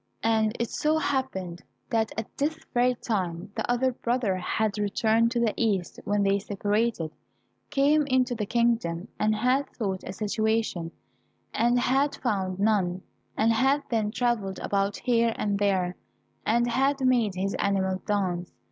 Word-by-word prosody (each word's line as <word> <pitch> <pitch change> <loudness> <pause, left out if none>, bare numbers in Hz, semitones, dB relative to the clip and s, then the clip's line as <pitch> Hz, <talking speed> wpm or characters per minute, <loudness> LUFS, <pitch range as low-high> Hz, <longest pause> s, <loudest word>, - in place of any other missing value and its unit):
And 220 -1 +2
it 235 - -1
so 310 +1 +1
happened 260 - -2 0.3
that 220 -1 +1
at 225 - -5
this 300 +3 -1 0.2
very 250 0 +3
time 185 -5 -3
the - - -3
other 250 +2 +2
brother 240 -5 0
who 185 - -5
had 215 +2 0 0.2
turned 225 +1 +3
to 235 0 -1
the 230 -2 +2
east 200 -6 -1
when 205 0 +1
they 200 0 +2
separated, 205 -3 -1 0.6
came 290 +1 +3
into 255 -2 +2
the 215 -3 -3
kingdom. 230 -7 0
He 215 - +3
had 255 +6 +1
sought 195 -5 -2
a - - -5
situation, 215 -3 -1 0.6
and 240 +1 +3
had 270 +4 +2
found 190 -6 -1
none, 190 -4 +1 0.3
and 225 +1 +3
had 270 +5 +2
then 220 -3 +1
travelled 220 -5 -1
about 200 0 -1
here 235 -2 +2
and 200 -1 -1
there, 190 -3 +1 0.5
and 235 +2 +3
had 270 +4 +1
made 235 -6 +2
his 195 +2 -1
animals 190 -1 0
dance. 185 -4 -1
220 Hz, 155 wpm, -27 LUFS, 195-245 Hz, 0.6 s, very